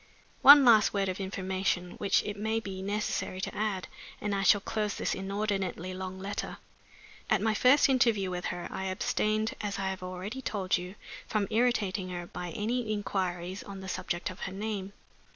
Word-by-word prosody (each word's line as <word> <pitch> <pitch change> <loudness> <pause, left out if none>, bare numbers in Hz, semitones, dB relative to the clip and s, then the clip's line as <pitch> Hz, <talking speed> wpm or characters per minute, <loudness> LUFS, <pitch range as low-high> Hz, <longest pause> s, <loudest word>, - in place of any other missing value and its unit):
One 285 0 +10
last 220 -4 +6
word 195 -1 +1
of 185 - -4
information, 190 -2 -1
which 200 - +2
it 205 - -4
may 220 +2 -1
be 195 -3 -6
necessary 200 -1 -2
to - - -4
add, 205 -3 -1 0.3
and 205 -1 -2
I 195 - 0
shall 205 +1 +5
close 210 0 -2
this - - -1
inordinately 195 -2 -2
long 185 0 -5
letter. 195 +2 -4 0.7
At 215 - +4
my 220 +2 +1
first 255 +6 +5
interview 230 -8 +2
with 180 0 -4
her 175 - -3
I 190 - -4
abstained, 215 +3 0
as 205 -2 -3
I 195 -1 -1
have 190 -1 -5
already 185 +7 -5
told 200 -6 0
you, 180 +2 -5 0.3
from 215 -2 0
irritating 215 -5 +1
her 175 -1 -5
by 180 0 -6
any 225 +5 -2
inquiries 185 -3 -2
on 195 -1 -8
the 190 - -7
subject 185 -1 -3
of 185 - -12
her 185 - -4
name. 200 -1 -4
195 Hz, 180 wpm, -30 LUFS, 185-215 Hz, 0.7 s, One